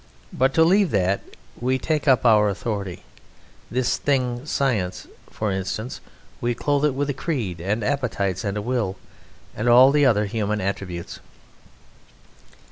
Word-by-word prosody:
But, 130 +1 +1
to 160 - +6
leave 190 +3 +4
that, 95 -1 +1 0.4
we 130 +2 +1
take 155 +2 -2
our 110 -5 +5
authority 100 -3 -4 0.7
this 125 +1 0
thing 130 -1 -1
"Science," 110 -13 -1 0.2
for 110 -2 -3
instance 95 +5 -4 0.4
we 120 0 0
clothe 145 +3 +1
it 145 -3 +1
with 140 +1 -1
a - - -3
creed 125 - -3
and 105 +5 -1
appetites 105 -7 -1
and 100 -1 -2
a 105 - -3
will, 115 -5 -1 0.6
and 115 +3 0
all 125 +3 +8
the 145 -1 +4
other 105 -4 +3
human 105 0 -2
attributes. 95 -3 -4
120 Hz, 140 wpm, -23 LUFS, 100-135 Hz, 0.7 s, all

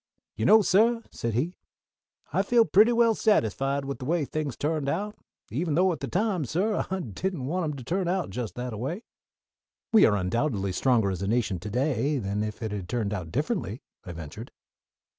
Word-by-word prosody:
"You - - -2
know, 220 0 +7
suh," 230 +5 +3
said 115 -2 -3
he, 155 +9 0 0.8
"I - - +3
feel 235 -2 +4
pretty 215 +4 +5
well 235 -1 +4
satisfied 135 - +1
with 140 0 -4
the 130 - -6
way 160 +1 +1
things 150 -3 -3
turned 150 -2 -1
out, 205 +7 -2 0.4
even 150 +5 -1
though 185 +2 +4
at 165 - -4
the - - -4
time, 195 -4 0
suh, 190 - 0
I 190 0 -1
didn't 145 - -3
want 175 +5 -1
'em 150 -2 -3
to 130 - -8
turn 180 +7 -1
out 185 0 -1
just 120 -3 -4
that 125 -1 -4
a - - -5
way." 165 - -3 0.9
"We 220 - +8
are 105 - +2
undoubtedly 100 +1 0
stronger 110 0 +2
as 95 -1 -4
a 100 - -1
nation 110 -4 0
to 105 - -6
day 135 +4 0
than 100 -3 -2
if 105 +2 -4
it 110 - -3
had 100 -4 -5
turned 110 -4 -1
out 90 -5 -5
differently," 130 - -2 0.2
I 90 - -7
ventured. 85 - -8
140 Hz, 200 wpm, -27 LUFS, 110-185 Hz, 0.9 s, We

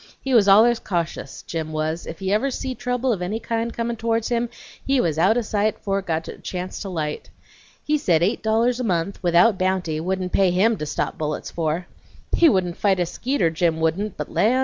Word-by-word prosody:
He 270 - -3
was 215 -4 +5
allers 225 +4 +6
cautious, 170 -7 -4
Jim 160 -1 -4
was; 155 +2 -2
if 165 - -6
he 190 +2 -1
ever 220 +7 +2
see 260 0 -3
trouble 250 0 -1
of 190 - -4
any 200 +5 -2
kind 230 0 -2
comin' 235 0 -3
towards 225 0 0
him, 240 -1 0 0.3
he 270 -1 +2
was 160 -7 0
out 195 +7 +4
o' - - +2
sight 215 -1 0
fore 195 -1 -1
it 190 - -10
got 160 -1 -1
a - - -8
chance 180 0 -5
to 200 - -5
light. 155 -4 -4 0.6
He 300 0 +1
said 170 - +2
eight 205 +7 +1
dollars 230 +3 +1
a - - -1
month, 185 -2 -1
without 180 +4 +4
bounty, 185 -4 0
wouldn't 185 +2 -2
pay 195 -2 +3
HIM 205 +5 +2
to 150 - -4
stop - - -3
bullets 150 -1 -3
for. 165 +1 -2 0.5
He 335 - +6
wouldn't 180 -7 0
fight 195 -3 +2
a 175 - +2
skeeter, 215 - 0
Jim 165 0 0
wouldn't, 175 +6 -1
but - - -5
land! 245 +5 +3
195 Hz, 215 wpm, -23 LUFS, 170-230 Hz, 0.6 s, allers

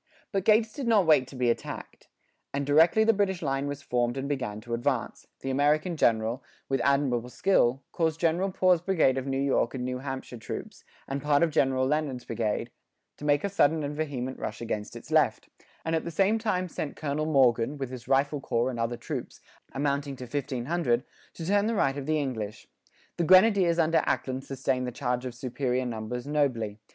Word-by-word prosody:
But 195 -3 -1
Gates 220 0 +4
did 275 -4 -4
not 215 -5 +4
wait 150 -5 +4
to - - -11
be 125 -2 +2
attacked; - - -7 0.5
and 140 0 -1
directly 160 +9 +5
the 225 +1 +4
British 190 -4 0
line 135 0 -1
was 145 0 -5
formed 120 -1 0
and 135 +1 -3
began 125 -7 -3
to 120 +1 -6
advance, 120 0 -2
the 135 - -2
American 150 +5 +2
general, 115 -2 +1 0.2
with 135 -2 0
admirable 135 -4 +1
skill, 135 -5 +2
caused 160 -1 0
General 175 +4 +1
Poor's 180 -2 +3
brigade 165 -8 +2
of 130 - -6
New 135 0 -1
York 135 -2 +1
and 125 -1 -3
New 125 0 -3
Hampshire 130 -2 -6
troops, - - -7 0.2
and 135 +1 -3
part 150 +1 +3
of 165 - +2
General 130 -2 +2
Leonard's 140 -3 -1
brigade, 110 -3 -2 0.5
to 150 - -8
make 145 0 +3
a - - +1
sudden 160 -5 +2
and 145 +1 -3
vehement 135 -4 -3
rush 110 0 -5
against 110 -3 -4
its - - -10
left, - - +2 0.4
and 165 0 0
at 160 - -1
the - - -4
same 195 +6 +2
time 185 -5 -1
sent 155 -3 -5
Colonel 155 +1 -2
Morgan, 130 -2 +3
with 135 -2 -4
his 125 -2 -8
rifle 140 +1 +2
corps 120 0 0
and 120 - -6
other 115 +1 -1
troops, 120 - -6 0.3
amounting 140 0 -1
to 130 - -9
1,500, 130 0 -1 0.3
to 165 - -6
turn 205 +3 +2
the 230 - 0
right 135 -8 +2
of 140 -1 -5
the 155 0 +2
English. 115 -8 -4 0.5
The 170 - +1
grenadiers 185 -1 +5
under 165 -1 +3
Ackland 130 0 -1
sustained 130 -1 -1
the - - -3
charge 125 0 -2
of 125 - -7
superior 125 0 -2
numbers 120 +1 -4
nobly. 125 -8 0
140 Hz, 195 wpm, -28 LUFS, 125-160 Hz, 0.5 s, directly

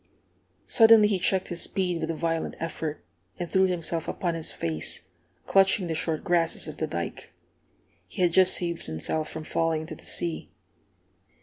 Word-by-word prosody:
Suddenly 225 -2 +7
he 195 -3 0
checked 190 +1 +1
his 175 -1 -2
speed 180 -3 -1
with 160 - -2
a 165 - -1
violent 165 0 -2
effort, 160 - -5 0.3
and 175 - -4
threw 190 +2 +3
himself 170 -2 -2
upon 175 -2 -2
his 165 -1 -1
face, 80 -1 -3 0.4
clutching 195 0 +3
the 165 - -2
short 160 0 -1
grasses 170 -2 +1
of - - -8
the - - -2
dike. - - -5 0.8
He 185 - -2
had 175 - +3
just 185 0 +6
saved 170 -1 -3
himself 80 - -2
from 160 - -6
falling 165 0 0
into 160 - -7
the - - -12
sea. 170 -2 -2
170 Hz, 170 wpm, -26 LUFS, 160-185 Hz, 0.8 s, Suddenly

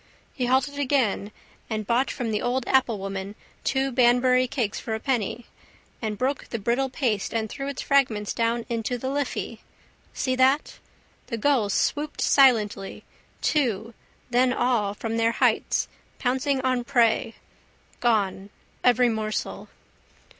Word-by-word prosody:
He 250 -2 -2
halted 270 +3 +1
again 255 -7 +1 0.4
and 215 -1 -2
bought 240 +5 +1
from 240 -4 -3
the 210 - -1
old 245 +1 -1
applewoman 195 -6 0 0.3
two 270 0 0
Banbury 250 +1 +4
cakes 240 -6 -2
for 220 - -3
a - - -4
penny 240 -2 -2 0.6
and 215 -2 -3
broke 265 +4 -2
the 230 - -3
brittle 240 +5 0
paste 235 -5 -1
and 220 -1 0
threw 275 +5 -6
its 280 -1 -4
fragments 235 -7 +2
down 230 0 0
into 235 +1 -2
the 260 +2 -3
Liffey. 285 0 -3 0.5
See 255 -1 -1
that? 265 +3 +2 0.5
The 230 - -3
gulls 225 -5 +2
swooped 300 0 -1
silently, 215 -8 +3 0.4
two, 230 -6 0 0.4
then 250 +1 +3
all 230 -6 +1
from 225 +1 -3
their 230 0 +2
heights, - - +1 0.3
pouncing 265 +2 0
on 255 -2 0
prey. 235 -3 +2 0.6
Gone. 200 -4 +1 0.3
Every 250 0 +5
morsel. 215 -2 -3
245 Hz, 135 wpm, -25 LUFS, 220-265 Hz, 0.6 s, Every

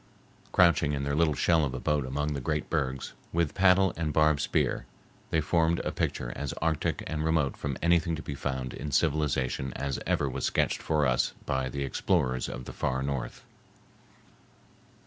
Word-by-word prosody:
Crouching 85 -4 +4
in 70 -1 -2
their 70 0 -1
little 80 -2 +3
shell 80 +1 +3
of 65 -3 -2
a - - -3
boat 75 -2 0
among 75 +3 -1
the 70 - -3
great 75 +2 -2
bergs, 65 -4 -1 0.2
with 85 -3 0
paddle 95 -1 +4
and 80 -2 -1
barbed 75 -1 +3
spear, - - 0 0.4
they 80 - +2
formed 85 +2 +2
a - - -2
picture - - -2
as 70 - -3
arctic 80 -1 -1
and 75 -1 -3
remote 80 -4 +1
from 70 -2 -4
anything 85 -1 +3
to 80 - -7
be 70 - -5
found 65 -2 -3
in 75 - -5
civilization 70 -3 0
as 70 -2 -3
ever 70 - +1
was 65 - -4
sketched - - +1
for 75 -2 +1
us 60 -2 +1
by 65 0 -1
the 70 +2 -3
explorers 65 -1 0
of 60 0 -6
the - - -8
Far 65 +1 -1
North. 70 -3 -4
75 Hz, 180 wpm, -29 LUFS, 65-80 Hz, 0.4 s, Crouching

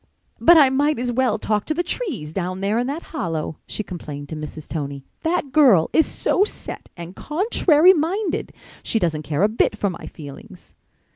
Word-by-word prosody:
"But 345 0 +7
I 285 -4 +7
might 290 +3 +2
as 245 +1 -1
well 245 -3 +1
talk 210 -1 -1
to 310 - -2
the 350 - 0
trees 305 - -3
down 185 +1 -3
there 205 +4 +1
in 245 - -1
that 295 +5 -4
hollow," 165 - -3
she 215 - -4
complained 145 -6 -8
to 160 - -5
Mrs. 155 0 -8
Tony. 140 -3 -5 0.2
"That 325 -4 -1
girl 245 - +5
is 320 - +4
so 390 - +1
set 425 - -6
and 175 +2 -8
contrary 350 0 +4
minded. 350 +3 -1 0.3
She - - -1
doesn't 165 -7 0
care 155 +3 -1
a - - +6
bit 215 0 0
for 200 -3 0
my 170 - -9
feelings." 145 -4 -12
220 Hz, 190 wpm, -22 LUFS, -, 0.3 s, But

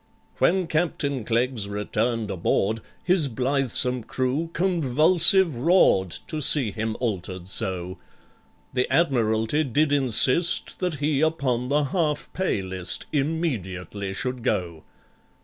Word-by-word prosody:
When 185 0 +2
CAPTAIN 150 -6 -1
CLEGGS 115 -2 -1
returned 105 +2 -2
aboard, 100 +4 0 0.2
His 180 -5 +2
blithesome 130 -1 0
crew 130 +8 -2
convulsive 170 0 +4
roar'd, 130 - +3 0.2
To 155 -2 -4
see 130 -5 +1
him 110 +1 -3
altered 95 -6 -3
so. 95 -1 -4 0.7
The 125 0 -1
Admiralty 120 -3 +1
did 145 +2 +1
insist 135 +4 +2
That 180 -4 -1
he 145 0 0
upon 130 -6 0
the 145 +1 +2
Half 150 0 -2
pay 185 - -1
List 95 -1 -3
Immediately 105 - -3
should 125 +1 -3
go. 85 -7 -2
130 Hz, 115 wpm, -24 LUFS, 110-155 Hz, 0.7 s, convulsive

